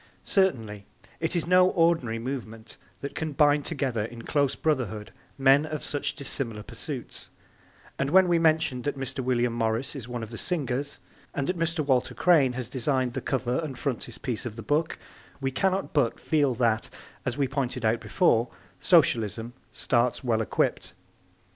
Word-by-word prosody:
Certainly, 115 - 0 0.3
it 160 +2 -1
is 170 - +1
no 180 +1 +5
ordinary 165 -11 +2
movement 115 -3 -6 0.2
that 140 - -5
can 155 -2 -3
bind 145 0 +3
together 130 -8 -1
in 115 +1 -7
close 140 -2 +1
brotherhood 120 -9 -1 0.3
men 135 +1 +5
of 155 -1 -5
such 145 - -2
dissimilar 120 -7 -3
pursuits, 85 - -7 0.7
and 135 - 0
when 190 +3 +6
we 170 -1 +3
mention 155 -5 +2
that 145 +2 -3
Mr. 135 0 -4
William 120 -1 +1
Morris 115 +4 -1
is 125 -5 -7
one 120 -2 -4
of 110 - -8
the 115 - -6
singers, 145 -4 -2 0.3
and 140 - 0
that 180 +3 -2
Mr. 165 -2 0
Walter 130 -3 +1
Crane 150 -8 +4
has 125 -2 -4
designed 130 -1 0
the - - -3
cover 125 -2 -1
and 150 -6 -5
frontispiece 125 -3 -3
of 120 -4 -6
the 115 - -7
book, 150 +9 0 0.4
we 135 -1 -1
cannot 190 +7 0
but 135 -6 +1
feel 145 -5 +1
that, 115 -2 +1 0.3
as 125 +1 -2
we 140 -2 +1
pointed 130 -3 -2
out 110 +1 +2
before, 120 -10 +2 0.3
Socialism 115 +2 +2 0.2
starts 120 +1 +1
well 115 -3 +1
equipped. 110 - -1
130 Hz, 165 wpm, -27 LUFS, 120-150 Hz, 0.7 s, when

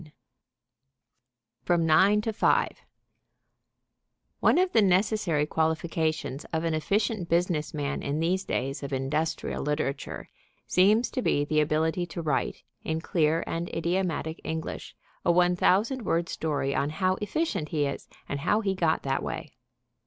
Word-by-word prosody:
IX 155 - -17 1.5
FROM 170 -2 +1
NINE 190 +7 +5
TO 220 +1 -2
FIVE - - +1 1.6
One - - +4
of 365 0 +3
the 225 - +5
necessary 185 -5 +2
qualifications 160 -2 -1
of 160 0 -3
an 165 -1 0
efficient 200 +4 0
business 170 -3 +1
man 145 -1 -3
in 145 +2 -2
these 180 +4 +1
days 135 -3 -2
of 140 -1 -5
industrial 145 +5 -1
literature 150 -1 -3 0.4
seems 210 +6 +3
to 255 - -2
be 145 -10 +1
the 155 +1 +1
ability 160 +4 0
to 170 - -5
write, 150 -4 -1 0.2
in 160 0 -1
clear 160 -1 +1
and 170 +1 -3
idiomatic 170 -2 -2
English, 160 0 -5 0.3
a - - +4
1,000 180 +8 +3
word 170 -5 0
story 145 -3 -1
on 140 - 0
how 185 +4 +1
efficient 210 - -1
he 150 -3 0
is 140 -1 -4 0.2
and 140 - -3
how 210 +9 +2
he 195 -3 0
got 165 -4 +1
that 135 0 0
way. - - -5
165 Hz, 145 wpm, -27 LUFS, 150-185 Hz, 1.6 s, NINE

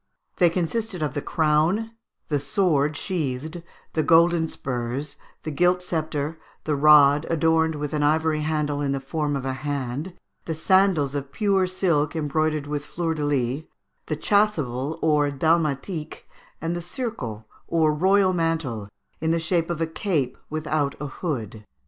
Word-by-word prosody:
They 175 -2 +5
consisted 180 +2 -2
of 150 - -1
the 145 - -2
crown, 160 +10 +1 0.4
the 145 -2 0
sword 150 0 +1
sheathed, 160 -2 -3 0.3
the 160 - +2
golden 165 +1 +4
spurs, 130 +2 -4 0.3
the 155 - -3
gilt 180 +4 +2
sceptre, 160 -2 -2 0.2
the 150 - 0
rod 145 0 +6
adorned 160 0 +2
with 150 0 -4
an 150 - 0
ivory 155 +1 +2
handle 150 -2 -1
in 140 -1 0
the 135 - -1
form 145 +2 -2
of 135 -1 -3
a 130 - -1
hand, 140 +4 -4 0.3
the 160 - -3
sandals 180 -5 +3
of 140 -1 -4
blue 195 -1 +2
silk, 170 -5 +1
embroidered 155 -1 0
with 145 0 -3
fleur 165 +1 -2
de 155 -2 -3
lis, 135 0 0 0.4
the 155 - -2
chasuble 155 - +1
or 150 -2 +3
dalmatique, 155 +2 -1 0.3
and 165 +1 -2
the 175 - -3
surcot, 175 - -5 0.2
or 160 -2 +2
royal 190 +4 +3
mantle, 160 - -1 0.3
in 160 - -1
the 165 +1 +2
shape 165 0 0
of 170 -1 -2
a - - +3
cape 160 -6 -1
without 155 -2 -1
a 150 - -4
hood. 120 - -4
155 Hz, 155 wpm, -24 LUFS, 145-170 Hz, 0.4 s, rod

